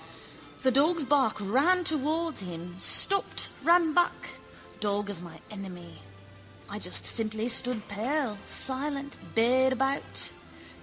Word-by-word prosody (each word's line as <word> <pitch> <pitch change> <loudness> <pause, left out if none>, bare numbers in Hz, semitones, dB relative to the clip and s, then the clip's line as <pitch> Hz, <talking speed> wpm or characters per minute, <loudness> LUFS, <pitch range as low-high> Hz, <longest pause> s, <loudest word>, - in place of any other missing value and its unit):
The 260 - +3
dog's 305 +5 +3
bark 270 -4 +2
ran 275 - +2
towards 315 -1 -1
him, 175 0 -8
stopped, 395 - +4
ran 335 -1 +3
back. 295 - 0 0.4
Dog 205 0 -2
of 180 -4 -9
my 170 -2 -11
enemy. 185 - -10 0.7
I 205 - -6
just 180 - 0
simply 220 0 0
stood 245 -2 +1
pale, 225 +1 -3
silent, 275 +1 -1 0.2
bayed 255 +3 +3
about. 270 +2 -2
255 Hz, 115 wpm, -28 LUFS, 205-295 Hz, 0.7 s, stopped